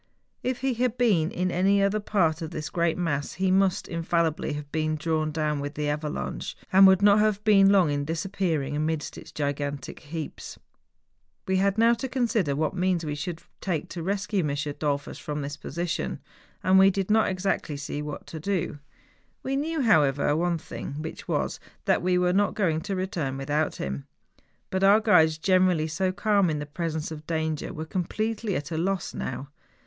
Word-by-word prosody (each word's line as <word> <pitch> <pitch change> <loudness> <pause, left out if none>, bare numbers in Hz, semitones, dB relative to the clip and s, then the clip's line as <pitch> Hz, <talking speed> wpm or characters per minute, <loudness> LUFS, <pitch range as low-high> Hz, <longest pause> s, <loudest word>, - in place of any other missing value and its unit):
If 250 -1 -2
he 265 -1 +1
had 245 0 0
been 200 -10 +3
in 180 0 -1
any 195 +3 +3
other 200 +2 +2
part 175 -6 +1
of 160 - -4
this 155 -2 -5
great 170 -1 +1
mass 145 -5 -1
he 190 0 0
must 190 -1 +2
infallibly 165 -2 0
have 145 -1 -7
been 155 -1 0
drawn 155 0 -1
down 150 -1 -1
with 145 +1 -5
the 150 0 -1
avalanche, 150 +1 -3 0.2
and 195 +1 +9
would 190 +1 +5
not 205 0 +6
have 210 -1 +2
been 195 -2 +6
long 190 -6 +4
in 145 0 -1
disappearing 160 -3 -1
amidst 155 0 -2
its - - -11
gigantic 145 -1 -3
heaps. 155 0 -7 0.9
We 190 0 +2
had 195 +2 +2
now 230 +1 +5
to 235 +3 -3
consider 230 - +1
what 155 +3 0
means 180 -2 0
we 150 - -2
should 160 +3 -5 0.2
take 170 -6 -2
to 170 - -6
rescue 200 +3 -1
M. - - 0 0.3
Dollfus 145 -2 -2
from 150 -1 -4
this 140 +1 -4
position. 170 +2 -3 0.4
And 190 +1 +5
we 195 0 +7
did 195 +1 -1
not 220 0 +4
exactly 185 -5 -1
see 145 +1 -4
what 150 -1 -6
to 160 - -7
do. 175 -3 -2 0.6
We 270 - -1
knew, 310 +2 -1
how¬ 160 - +5
ever, 140 +2 +1
one 170 +1 +1
thing, 155 - -7
which 160 - -7
was, - - -1 0.3
that - - +3
we 180 +1 +2
were 180 0 +2
not 205 +1 +2
going 165 -6 +1
to 195 +3 -3
return 170 -8 -2
without 150 +3 -1
him. 70 +1 -5 0.6
But 190 0 0
our 200 +2 +7
guides, 160 -8 +4
generally 185 -2 +3
so 185 +4 0
calm 200 -1 +2
in 155 - -1
the 145 - -4
presence 160 +1 -3
of 155 -1 -8
danger, 160 -2 -2
were 160 -3 -5
completely 210 +4 -2
at 145 +3 -4
a 160 - -1
loss 190 +2 -1
now. 135 +2 -5
170 Hz, 190 wpm, -26 LUFS, 150-195 Hz, 0.9 s, and